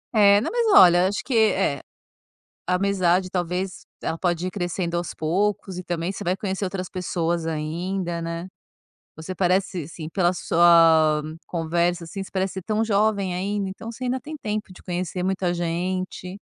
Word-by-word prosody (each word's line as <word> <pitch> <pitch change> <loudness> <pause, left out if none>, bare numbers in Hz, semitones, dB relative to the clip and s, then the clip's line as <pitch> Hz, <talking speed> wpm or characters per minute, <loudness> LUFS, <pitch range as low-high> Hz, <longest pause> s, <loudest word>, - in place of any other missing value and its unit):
É, 200 -1 +7
não - - -2
mas 475 -1 +1
olha, 175 0 +7
acho 205 - -2
que, 265 - -3
eh 195 - +2 0.9
a 180 - +2
amizade 185 -1 +2
talvez 180 +1 -3 0.2
ela - - -1
pode 175 0 -1
ir 185 - -2
crescendo 175 -2 -2
aos 175 - -3
poucos, 190 +3 -1
e - - -6
também 175 +1 -2
você 205 - -7
vai 180 +1 +1
conhecer 195 0 -2
outras 185 -1 -4
pessoas 170 -2 -2
ainda, 170 +3 -3
né. 170 +2 -4 0.7
Você 160 +4 -7
parece 185 +1 +2
ser, 180 -4 -4
assim, 160 0 -8
pela 175 0 +2
sua 165 -3 +5 0.2
conversa, 170 +1 0
assim, 195 +4 -6
você - - -13
parece 190 0 -1
ser 190 - -5
tão 215 +3 0
jovem 200 -3 +1
ainda. 200 +1 -2
Então 225 +4 -7
você 255 +3 -7
ainda 255 +1 0
tem 310 +5 -8
tempo 210 -6 -4
de - - -15
conhecer 180 0 -3
muita 190 -1 0
gente. 180 +2 -3
185 Hz, 175 wpm, -24 LUFS, 170-195 Hz, 0.9 s, É